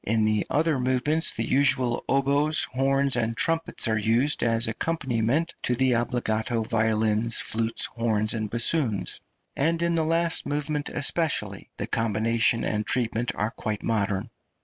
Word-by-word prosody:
In 110 Hz, 0 st, +1 dB
the 110 Hz, -1 st, 0 dB
other 155 Hz, -1 st, 0 dB
movements 130 Hz, +6 st, +1 dB
the 115 Hz, 0 st, -3 dB
usual 130 Hz, -3 st, +2 dB
oboes, 140 Hz, +3 st, +3 dB
horns, 135 Hz, +1 st, +1 dB
and 115 Hz, -1 st, -2 dB
trumpets 165 Hz, -6 st, +1 dB
are 110 Hz, -1 st, 0 dB
used 115 Hz, +7 st, +1 dB
as 115 Hz, -1 st, +2 dB
accompaniment 135 Hz, +2 st, -1 dB
to 125 Hz, -, 0 dB
the 130 Hz, +1 st, +1 dB
obbligato 115 Hz, -1 st, -1 dB
violins, 110 Hz, 0 st, +1 dB
flutes, 115 Hz, +1 st, +1 dB
horns, 110 Hz, -2 st, 0 dB
and 110 Hz, -2 st, -3 dB
bassoons, 115 Hz, -, +1 dB, 0.3 s
and 165 Hz, +4 st, +1 dB
in 170 Hz, 0 st, +1 dB
the 165 Hz, -1 st, +1 dB
last 165 Hz, +1 st, 0 dB
movement 150 Hz, 0 st, -3 dB
especially 130 Hz, -, -1 dB
the -, -, -3 dB
combination 115 Hz, +1 st, 0 dB
and 105 Hz, 0 st, -1 dB
treatment 120 Hz, -1 st, 0 dB
are 105 Hz, +2 st, -2 dB
quite 105 Hz, -2 st, -5 dB
modern. 105 Hz, 0 st, -2 dB
120 Hz, 145 wpm, -25 LUFS, 110-140 Hz, 0.3 s, oboes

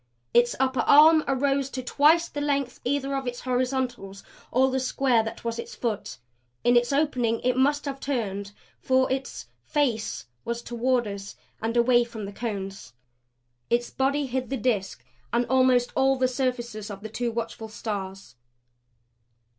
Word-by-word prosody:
Its 240 Hz, 0 st, +4 dB
upper 260 Hz, -1 st, +1 dB
arm 310 Hz, +5 st, +7 dB
arose 275 Hz, 0 st, +1 dB
to 260 Hz, -1 st, -5 dB
twice 310 Hz, +6 st, +4 dB
the 290 Hz, -, -5 dB
length 280 Hz, -3 st, -1 dB
either 275 Hz, +1 st, -1 dB
of 270 Hz, -1 st, -3 dB
its 245 Hz, 0 st, -4 dB
horizontals 250 Hz, -6 st, -2 dB, 0.3 s
or 260 Hz, +2 st, +3 dB
the 265 Hz, -, 0 dB
square 255 Hz, -2 st, +2 dB
that 225 Hz, 0 st, -7 dB
was 230 Hz, 0 st, -3 dB
its -, -, -7 dB
foot. 225 Hz, -4 st, -3 dB, 0.5 s
In 245 Hz, 0 st, +4 dB
its 240 Hz, +1 st, +3 dB
opening 255 Hz, -6 st, +1 dB
it 250 Hz, 0 st, +1 dB
must 290 Hz, +3 st, +2 dB
have 275 Hz, -1 st, -4 dB
turned, 205 Hz, -8 st, -3 dB, 0.3 s
for 260 Hz, 0 st, +2 dB
its 265 Hz, 0 st, -3 dB, 0.2 s
FACE 240 Hz, -, -1 dB, 0.2 s
was 235 Hz, 0 st, -4 dB
toward 245 Hz, +1 st, 0 dB
us 200 Hz, 0 st, -7 dB, 0.3 s
and 225 Hz, +2 st, -1 dB
away 240 Hz, 0 st, +5 dB
from 230 Hz, -3 st, -7 dB
the 200 Hz, -, -7 dB
Cones, 195 Hz, -, -5 dB, 0.8 s
its 240 Hz, 0 st, +1 dB
body 280 Hz, +2 st, 0 dB
hid 255 Hz, -1 st, -3 dB
the 270 Hz, -, -1 dB
Disk, 200 Hz, -, -1 dB, 0.3 s
and 240 Hz, -, +2 dB
almost 255 Hz, 0 st, +3 dB
all 270 Hz, 0 st, +3 dB
the 260 Hz, -1 st, +2 dB
surfaces 240 Hz, -4 st, -3 dB
of 200 Hz, -1 st, -7 dB
the 220 Hz, -, -6 dB
two 235 Hz, +2 st, -2 dB
watchful 225 Hz, -1 st, -5 dB
Stars. 195 Hz, -, -6 dB
245 Hz, 160 wpm, -26 LUFS, 225-265 Hz, 0.8 s, arm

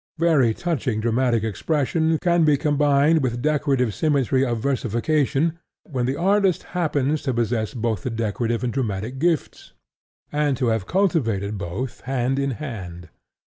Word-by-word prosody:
Very 150 Hz, -9 st, +3 dB
touching 145 Hz, -10 st, -1 dB
dramatic 115 Hz, 0 st, +1 dB
expression 160 Hz, -, 0 dB
can 175 Hz, -1 st, +3 dB
be 150 Hz, -2 st, +4 dB
combined 145 Hz, +1 st, +3 dB
with 120 Hz, -2 st, -1 dB
decorative 140 Hz, -5 st, +1 dB
symmetry 135 Hz, -3 st, +1 dB
of 120 Hz, -3 st, 0 dB
versification 140 Hz, +6 st, 0 dB, 0.2 s
when 130 Hz, -, -2 dB
the 135 Hz, -, 0 dB
artist 195 Hz, +1 st, +2 dB
happens 150 Hz, -4 st, 0 dB
to 130 Hz, -4 st, -2 dB
possess 115 Hz, 0 st, -1 dB
both 115 Hz, -4 st, -1 dB
the -, -, -3 dB
decorative 115 Hz, +1 st, -2 dB
and 120 Hz, -, -1 dB
dramatic 115 Hz, 0 st, -3 dB
gifts, 165 Hz, -1 st, -1 dB, 0.6 s
and 145 Hz, -3 st, +1 dB
to 125 Hz, -1 st, +1 dB
have 110 Hz, -4 st, -1 dB
cultivated 115 Hz, -, 0 dB
both 100 Hz, +7 st, -5 dB
hand 130 Hz, +1 st, -1 dB
in 140 Hz, 0 st, 0 dB
hand. 90 Hz, -, -7 dB
130 Hz, 140 wpm, -23 LUFS, 115-155 Hz, 0.6 s, be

